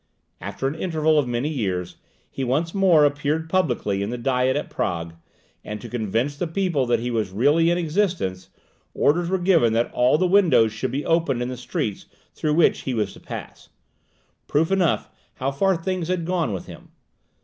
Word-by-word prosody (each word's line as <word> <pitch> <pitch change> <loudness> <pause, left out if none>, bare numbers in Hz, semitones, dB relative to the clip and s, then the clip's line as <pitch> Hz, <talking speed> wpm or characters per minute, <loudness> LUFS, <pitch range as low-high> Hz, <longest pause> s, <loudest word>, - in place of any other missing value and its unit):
After 100 +8 -3
an 135 - -2
interval 160 -2 +1
of 140 - 0
many 120 +4 -1
years, 95 - -3 0.3
he 135 - -4
once 150 +7 0
more 180 -6 +5
appeared 145 +2 0
publicly 120 - 0
in 100 - -2
the 125 - -3
Diet 130 +1 +1
at 145 - -2
Prague; 85 -8 -3 0.5
and 105 0 -6
to - - -9
convince 120 +4 -1
the 170 +4 -2
people 165 -6 0
that 120 - +2
he 120 +1 -3
was 110 -4 -1
really 145 - +3
still 170 - +4
in - - -1
existence, 165 - -1 0.5
orders 170 +3 +2
were 190 - +1
given 175 -11 +3
that 115 +1 0
all 125 +4 +3
the 185 - +1
windows 170 - +4
should 120 +4 -3
be 135 +5 -3
opened 165 -7 +1
in 120 - -3
the 130 - -4
streets 115 -4 -4 0.3
through 150 -1 -1
which 170 - +4
he 130 - -3
was 105 -3 -1
to - - -14
pass - - -9 0.8
proof 160 +5 +1
enough 190 -4 +1 0.3
how 135 +2 -2
far 190 +7 +2
things 175 0 -3
had 180 -2 -1
gone 175 -7 0
with 95 -3 -5
him. - - -12
145 Hz, 195 wpm, -23 LUFS, 120-170 Hz, 0.8 s, more